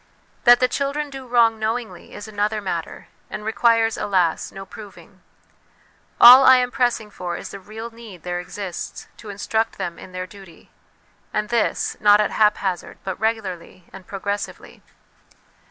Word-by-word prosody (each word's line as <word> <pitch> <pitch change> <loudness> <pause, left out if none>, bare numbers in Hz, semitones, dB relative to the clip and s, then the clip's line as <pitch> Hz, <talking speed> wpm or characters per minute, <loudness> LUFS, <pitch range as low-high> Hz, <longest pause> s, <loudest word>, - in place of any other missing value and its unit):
That 240 0 +8
the 255 - +3
children 280 +3 -2
do 265 -1 -9
wrong 230 -2 +3
knowingly 225 +2 -4
is 205 - -8
another 210 0 -1
matter, 175 -5 -5 0.2
and 210 - -7
requires, 225 +1 +2
alas, 180 -5 0
no 195 0 -9
proving; 205 +1 -13 1.0
all 250 +3 +11
I 260 0 +8
am 250 0 0
pressing 240 -5 0
for 175 -3 -5
is - - -8
the 200 - -8
real 220 +4 -9
need 225 -7 -13
there 175 0 -3
exists 180 0 -7
to 215 - -11
instruct 220 +2 -2
them 175 -3 -5
in 185 - -12
their 185 0 -5
duty; 190 -4 -16 0.6
and 210 0 -2
this, 235 -2 0
not 205 0 +6
at 210 - +1
haphazard, 205 -4 0
but 190 -1 -5
regularly 190 -6 -3
and 185 - -12
progressively. 200 +1 -5
210 Hz, 155 wpm, -22 LUFS, 190-230 Hz, 1.0 s, all